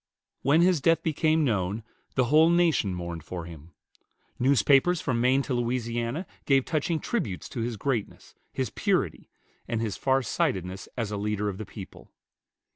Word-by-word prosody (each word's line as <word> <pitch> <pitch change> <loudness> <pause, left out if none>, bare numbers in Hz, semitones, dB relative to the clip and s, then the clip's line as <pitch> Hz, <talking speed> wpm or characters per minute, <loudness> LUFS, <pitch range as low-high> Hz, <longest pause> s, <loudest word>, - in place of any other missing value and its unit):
When 150 +4 +4
his 175 -4 +3
death 165 +1 +3
became 155 0 +2
known, 105 -2 -1 0.3
the 130 - +3
whole 155 +6 +5
nation 165 - +2
mourned 85 -2 -5
for 85 +1 -6
him. 85 0 -12 0.6
Newspapers 140 +6 +4
from 115 -5 -1
Maine 130 +3 +3
to 135 - -3
Louisiana 120 +4 -1 0.2
gave 135 -2 +4
touching 160 +1 0
tributes 105 - -3
to - - -6
his 115 -1 -3
greatness, 120 -1 -3 0.2
his - - -2
purity, - - -1 0.4
and 115 -2 -1
his 110 -3 -2
far 135 0 +2
sightedness 95 -4 -2
as 115 -4 -2
a 105 - -2
leader 105 0 -1
of 95 0 -6
the 110 - -6
people. 100 -3 -11
120 Hz, 160 wpm, -27 LUFS, 100-145 Hz, 0.6 s, whole